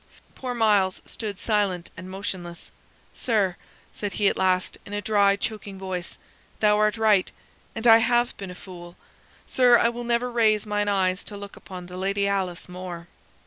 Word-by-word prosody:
Poor 250 -2 -5
Myles 205 -5 +3
stood 210 -4 -6
silent 200 -5 0
and 185 +2 -9
motionless. 185 -3 -6 0.4
"Sir," 205 -7 0 0.4
said 205 -2 -4
he 205 +1 +2
at - - +2
last, 185 -1 +1
in 200 - -10
a 205 - -1
dry 200 -1 +3
choking 205 -1 -5
voice, 185 -2 -5 0.4
"thou 210 -1 +4
art 215 +1 +2
right, 215 -4 +3 0.4
and 225 - -4
I 225 -1 +9
have 240 +1 +2
been 195 -2 -7
a 180 - -8
fool. 175 -2 -11 0.5
Sir, 245 -2 +5
I 230 - +3
will 240 0 -5
never 240 +1 0
raise 220 -3 +3
mine 205 0 -1
eyes 190 -2 +1
to 205 - -7
look 200 0 -9
upon 185 -2 -9
the 180 +1 -9
Lady 200 +1 0
Alice 190 -3 -2
more." 180 -1 -8
200 Hz, 175 wpm, -25 LUFS, 185-220 Hz, 0.5 s, I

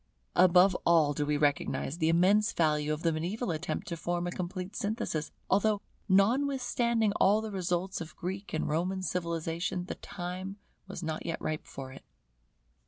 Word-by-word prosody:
Above 185 +1 +6
all 160 -4 +4
do 145 +1 -1
we 150 0 +2
recognize 145 +1 0
the 160 -1 +3
immense 195 +6 +4
value 150 -2 +1
of 155 +1 -3
the 165 - +3
mediaeval 180 +7 -2
attempt 160 +1 -3
to 170 - -3
form 175 +2 -2
a 175 - -2
complete 180 +2 -5
synthesis, 200 -7 -2 0.2
although, 205 +1 +3 0.3
notwithstanding 235 +1 +2
all 205 +2 +5
the 220 -1 -5
results 180 -1 -1
of 160 -1 -8
Greek 190 +3 -5
and 155 - -1
Roman 180 +5 -1
civilization, 170 0 -2
the - - -4
time 185 +1 -6 0.3
was 190 -2 -7
not 160 -1 -3
yet 165 -1 -3
ripe 155 0 -3
for 135 -1 -8
it. 135 - -12
175 Hz, 165 wpm, -30 LUFS, 160-195 Hz, 0.3 s, Above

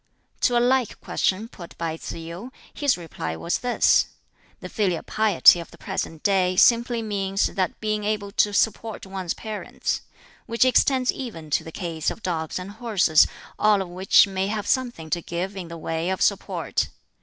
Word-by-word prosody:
To 245 - +3
a - - +5
like 250 -1 +1
question 195 +4 -1
put 175 -7 -12
by 165 -1 -2
Tsz - - -7
yu, 170 +9 -8 0.2
his 285 -7 +1
reply 145 - -5
was 170 - -2
this: 245 -1 +3 0.5
"The - - -7
filial 185 -7 -1
piety 210 -5 +5
of 170 - -8
the - - -16
present 160 -1 -4
day 185 -2 +2
simply 235 +3 +4
means 195 -2 0
the 185 -3 -1
being 215 -1 -1
able 205 -1 -2
to 210 0 +2
support 220 +1 -1
one's 190 -3 -4
parents 215 -2 -4 0.5
which 230 +2 +2
extends 255 0 +3
even 165 - -7
to - - +2
the 160 - -9
case 165 -2 -2
of 225 - -8
dogs 160 -3 -2
and 185 +2 -6
horses, 205 -8 +3 0.3
all 210 -1 +4
of 190 -2 -4
which 185 +2 +5
may 190 -1 -2
have 210 0 -3
something 240 - -1
to 175 - 0
give 180 +4 -4
in 185 -3 -6
the 170 0 -8
way 165 +2 -2
of 190 - 0
support. - - 0
195 Hz, 180 wpm, -24 LUFS, 170-220 Hz, 0.5 s, a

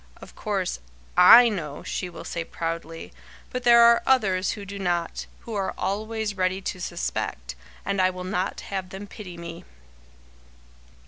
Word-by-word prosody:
Of - - -14
course, - - -2 0.4
I 230 +7 +9
know," 155 -10 -4
she 180 - -3
will 170 - -9
say, 170 - -4
proudly, 165 0 -5 0.4
"but 250 - -3
there 235 -1 +7
are 235 0 +6
others 195 -8 +2
who 205 - -8
do 200 +1 -7
not, 175 -3 -2
who 230 - -8
are 195 -2 -2
always 215 +1 -2
ready 185 0 0
to 185 -1 -5
suspect, 60 - -3 0.3
and 200 -1 0
I 185 - +4
will 185 0 -6
not 185 0 -2
have 190 -2 -5
them 190 +2 -7
pity 195 -4 -10
me!" 170 0 -8
185 Hz, 155 wpm, -25 LUFS, 175-210 Hz, 0.4 s, I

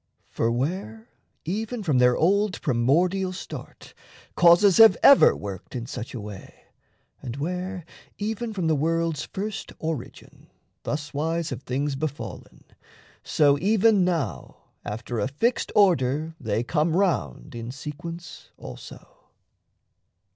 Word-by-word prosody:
For 115 - 0
where, 120 - -3 0.4
even 220 +6 -3
from 150 -9 +2
their 125 0 +4
old 200 +3 +2
primordial 175 +9 +1
start 185 - -9 0.4
Causes 175 +2 +6
have 225 -1 +8
ever 280 - +8
worked 100 +3 -8
in 120 -2 -4
such 125 -1 -7
a - - -4
way, 105 -2 -10 0.6
And 125 -3 -6
where, 180 +4 -4 0.3
even 220 +2 -3
from 190 -5 -3
the 160 -1 +2
world's 165 +1 0
first 205 +2 -5
origin, 160 -6 -7 0.4
Thuswise 155 +2 -2
have 130 - -5
things 140 +2 -2
befallen, 145 +1 -6 0.6
so 145 -2 +3
even 210 +1 +3
now 165 - -3 0.2
After 115 +2 -4
a 105 - 0
fixed 225 - -1
order 160 -5 +3
they 110 -1 -1
come 155 +5 0
round 95 - -1
In 115 0 -6
sequence 165 +5 -8
also. 65 -2 -11
155 Hz, 120 wpm, -25 LUFS, 125-185 Hz, 0.6 s, have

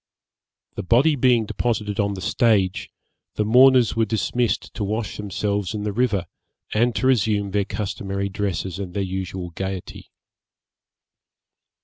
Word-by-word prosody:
The - - -4
body 125 - +3
being 125 -4 +3
deposited 105 -2 -2
on 100 -1 +1
the 95 - -7
stage, 100 -4 +1 0.5
the 105 - 0
mourners 125 +1 +5
were 115 0 +2
dismissed 115 +2 -1
to - - -4
wash 105 +1 -3
themselves 105 0 -2
in 105 - -3
the 105 - -1
river, 110 -6 +1 0.5
and 120 +2 +2
to - - -1
resume 105 -5 +2
their 100 0 +1
customary 100 -2 -3
dresses 95 -2 -3
and 90 -3 -6
their 100 - 0
usual 95 -1 -4
gaiety. 95 +1 -6
105 Hz, 135 wpm, -22 LUFS, 95-115 Hz, 0.5 s, mourners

